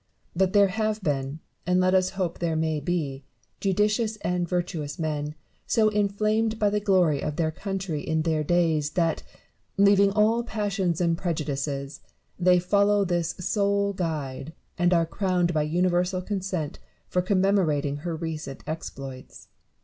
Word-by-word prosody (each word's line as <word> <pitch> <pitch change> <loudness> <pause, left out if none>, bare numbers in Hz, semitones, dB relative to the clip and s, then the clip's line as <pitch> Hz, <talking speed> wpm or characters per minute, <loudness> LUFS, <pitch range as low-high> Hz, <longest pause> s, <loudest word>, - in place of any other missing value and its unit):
But 190 +1 +2
there 200 -1 +5
have 215 +1 -1
been, 140 -1 -2 0.3
and 180 0 +3
let 185 0 +3
us 185 -1 +3
hope 180 -3 -2
there 170 -2 0
may 160 -1 0
be, 145 -4 -2 0.4
judicious 210 +3 +1
and 175 -1 -1
virtuous 170 -5 -2
men, 150 -2 -3 0.3
so 220 -1 +3
inflamed 215 +2 +1
by 210 -2 +2
the 210 - +1
glory 185 -8 +2
of 150 - -3
their 160 -1 0
country 190 -3 -4
in 160 0 -1
their 160 -2 +1
days, 160 -2 +2
that, 165 -2 +1 0.6
leaving 200 0 +5
all 215 +3 +3
passions 200 -6 -1
and 170 -1 +2
prejudices, 145 -5 -3 0.4
they 180 0 +5
follow 200 +3 +3
this 175 -2 -1
sole 200 +2 +1
guide, 155 -5 -4 0.2
and 175 0 +2
are 170 -2 +4
crowned 180 -1 0
by 155 - +2
universal 180 +3 +1
consent 185 -6 -3 0.3
for 180 - +1
commemorating 180 -7 +1
her 165 +3 -4
recent 160 -4 -5
exploits. 135 -5 -7
175 Hz, 145 wpm, -26 LUFS, 155-200 Hz, 0.6 s, there